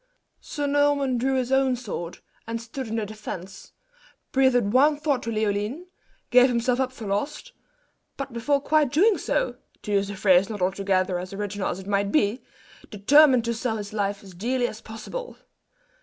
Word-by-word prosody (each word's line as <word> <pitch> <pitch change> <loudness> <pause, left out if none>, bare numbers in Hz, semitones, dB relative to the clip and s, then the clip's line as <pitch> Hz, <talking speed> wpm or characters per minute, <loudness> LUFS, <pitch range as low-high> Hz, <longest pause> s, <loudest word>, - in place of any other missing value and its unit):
Sir 290 -1 -4
Norman 285 -3 +2
drew 265 +2 +1
his 255 -1 -1
own 265 -1 +3
sword, 195 -8 -6 0.3
and 230 0 -3
stood 235 +2 -7
on 225 - -3
the 220 -2 -1
defence, 195 -3 -8 0.6
breathed 245 -6 +3
one 290 +3 +5
thought 290 -4 0
to 230 - -4
Leoline, 215 - -1 0.5
gave 250 +1 +7
himself 245 +1 0
up 260 -1 0
for 235 -4 -9
lost; 245 - -3 0.7
but 275 -3 -5
before 280 +5 +1
quite 295 -1 +2
doing 390 +8 +4
so - - -1 0.3
to 210 - -5
use 200 -1 +1
a 205 - -5
phrase 190 -1 +4
not 210 -2 -5
altogether 185 -1 0
as 185 +2 -7
original 205 0 -3
as - - -3
it 190 - -10
might 200 0 0
be 240 -4 +1 0.5
"determined 255 +4 +5
to 235 - 0
sell 230 -1 -2
his 205 0 -7
life 200 -1 -2
as 190 -2 -13
dearly 245 +7 -1
as 220 - -8
possible." 225 - -7
230 Hz, 175 wpm, -25 LUFS, 200-270 Hz, 0.7 s, gave